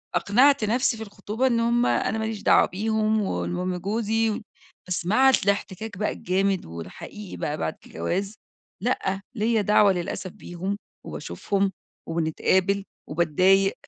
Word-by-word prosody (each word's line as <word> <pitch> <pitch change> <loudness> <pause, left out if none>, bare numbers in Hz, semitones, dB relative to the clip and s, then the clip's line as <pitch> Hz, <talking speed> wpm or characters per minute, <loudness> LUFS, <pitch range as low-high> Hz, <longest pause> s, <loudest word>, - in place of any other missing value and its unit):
أقنعت 260 +5 +4
نفسي 230 +2 +1
في 220 - -5
الخطوبة 210 +4 -2
إن 235 -2 +2
هُم 235 +1 +2
أنا 220 - +1
ماليش 220 -1 -3
دعوة - - +6
بيهم، 215 +2 0
والمهم 180 -1 -2
جوزي، 220 +3 0 0.5
بس 180 -1 -2
مع 255 +8 +5
اس 265 - +3
الاحتكاك 200 +1 -2
بقى 210 - 0
الجامد 190 +1 0
والحقيقي 90 - -8
بقى 150 +1 -2
بعد 80 - -2
الجواز، 195 - -3 0.5
لأ، 195 -5 -1
ليَّ 220 0 +2
دعوة 205 0 +5
للأسف 180 +1 -4
بيهم 195 0 -5 0.3
وباشوفهم 200 -1 -2 0.4
وبنتقابل 185 +4 +1 0.2
وباتضايق. 185 +5 +3
200 Hz, 130 wpm, -25 LUFS, 185-220 Hz, 0.5 s, دعوة